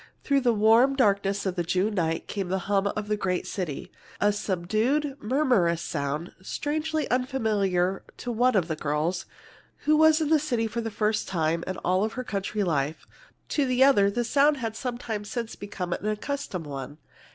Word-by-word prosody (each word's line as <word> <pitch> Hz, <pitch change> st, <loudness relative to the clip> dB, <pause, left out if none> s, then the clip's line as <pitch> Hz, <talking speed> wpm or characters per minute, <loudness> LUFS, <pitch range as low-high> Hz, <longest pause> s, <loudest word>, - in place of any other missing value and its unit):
Through 280 Hz, -1 st, +2 dB
the 245 Hz, -2 st, +3 dB
warm 225 Hz, +5 st, +5 dB
darkness 200 Hz, -5 st, +2 dB
of 190 Hz, -, 0 dB
the 175 Hz, -, 0 dB
June 185 Hz, +5 st, 0 dB
night 165 Hz, -4 st, -1 dB
came 195 Hz, -3 st, -3 dB
the 190 Hz, +2 st, 0 dB
hum 200 Hz, 0 st, +2 dB
of 210 Hz, +1 st, -3 dB
a -, -, +3 dB
great 185 Hz, -3 st, -1 dB
city, 175 Hz, -8 st, -4 dB, 0.3 s
a 205 Hz, 0 st, +3 dB
subdued, 215 Hz, +10 st, 0 dB
murmurous 215 Hz, -, +2 dB
sound, 150 Hz, +2 st, -3 dB
strangely 310 Hz, +8 st, -2 dB
unfamiliar 210 Hz, -8 st, +1 dB, 0.2 s
to 245 Hz, -, -4 dB
one 245 Hz, +2 st, +2 dB
of 180 Hz, -4 st, +2 dB
the 160 Hz, -, -2 dB
girls, 155 Hz, +4 st, -1 dB, 0.6 s
who 305 Hz, -, +5 dB
was 315 Hz, 0 st, +6 dB
in 310 Hz, -2 st, 0 dB
the 315 Hz, -1 st, +5 dB
city 250 Hz, -6 st, 0 dB
for 225 Hz, +1 st, -3 dB
the 225 Hz, -, -3 dB
first 215 Hz, 0 st, 0 dB
time 165 Hz, -2 st, 0 dB
in 185 Hz, -1 st, -3 dB
all 185 Hz, +4 st, +2 dB
her 255 Hz, +3 st, -5 dB
country 205 Hz, -1 st, -2 dB
life. 150 Hz, -3 st, -1 dB, 0.4 s
To 285 Hz, -3 st, +1 dB
the 255 Hz, +1 st, +4 dB
other 205 Hz, -8 st, +5 dB
the 240 Hz, +4 st, -1 dB
sound 285 Hz, +4 st, +3 dB
had 225 Hz, -4 st, -4 dB
some 245 Hz, 0 st, -3 dB
time 220 Hz, -4 st, -4 dB
since 230 Hz, +2 st, -4 dB
become 185 Hz, -3 st, -4 dB
an 210 Hz, -, -4 dB
accustomed 215 Hz, -, -3 dB
one. 140 Hz, 0 st, -6 dB
210 Hz, 185 wpm, -26 LUFS, 180-250 Hz, 0.6 s, was